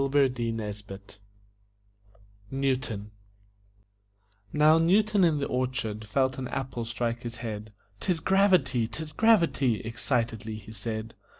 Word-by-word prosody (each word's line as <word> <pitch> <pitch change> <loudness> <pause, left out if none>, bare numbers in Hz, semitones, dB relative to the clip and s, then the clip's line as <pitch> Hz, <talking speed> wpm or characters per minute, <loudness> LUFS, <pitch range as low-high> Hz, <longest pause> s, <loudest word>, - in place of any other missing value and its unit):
NEWTON 125 -6 -2 1.4
Now, 155 +2 +5
Newton 200 +4 +4
in 165 -3 +4
the 140 - -1
orchard 125 -5 -2
felt 130 +3 +1
an 130 - -3
apple 130 -3 -4
strike 115 0 -2
his 120 -1 -6
head. 105 -1 -5 0.3
"'Tis 180 -3 0
gravity! 175 - +3
'Tis 160 +5 -5
gravity!" 170 - +3
excitedly 115 -2 -2
he 110 0 -10
said. 110 +1 -5
130 Hz, 100 wpm, -28 LUFS, 115-155 Hz, 1.4 s, Now